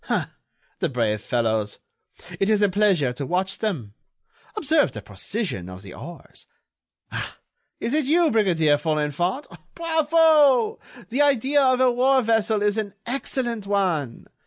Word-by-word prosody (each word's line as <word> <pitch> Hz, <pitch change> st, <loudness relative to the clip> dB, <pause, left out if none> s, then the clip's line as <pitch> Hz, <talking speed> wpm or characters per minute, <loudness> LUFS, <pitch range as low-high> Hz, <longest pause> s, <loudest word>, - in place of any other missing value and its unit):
Ah! -, -, -1 dB, 0.5 s
the 170 Hz, -, 0 dB
brave 110 Hz, -5 st, -1 dB
fellows! 110 Hz, -4 st, -1 dB, 0.6 s
It 195 Hz, -, +1 dB
is 210 Hz, -1 st, +3 dB
a 205 Hz, -, +4 dB
pleasure 185 Hz, -10 st, +2 dB
to 140 Hz, -, -5 dB
watch 185 Hz, +6 st, -2 dB
them. 150 Hz, -, -3 dB, 0.6 s
Observe 315 Hz, -6 st, +2 dB
the 105 Hz, -, -8 dB
precision 100 Hz, -, -4 dB
of 90 Hz, +1 st, -10 dB
the 95 Hz, -, -11 dB
oars! 175 Hz, 0 st, -11 dB, 0.6 s
Ah! -, -, -5 dB, 0.4 s
is 235 Hz, -, -3 dB
it 305 Hz, -2 st, +1 dB
you, 330 Hz, +3 st, +3 dB
Brigadier 170 Hz, -9 st, +3 dB
Folenfant? 155 Hz, -, -1 dB, 0.3 s
Bravo! 315 Hz, -6 st, +3 dB, 0.3 s
The 255 Hz, +5 st, 0 dB
idea 285 Hz, 0 st, +3 dB
of 255 Hz, -1 st, +3 dB
a 260 Hz, -1 st, +4 dB
war 260 Hz, +2 st, +3 dB
vessel 220 Hz, -2 st, +1 dB
is 210 Hz, +1 st, +1 dB
an 205 Hz, -2 st, -5 dB
excellent 240 Hz, -3 st, -3 dB
one. 175 Hz, -11 st, -1 dB
205 Hz, 140 wpm, -23 LUFS, -, 0.6 s, a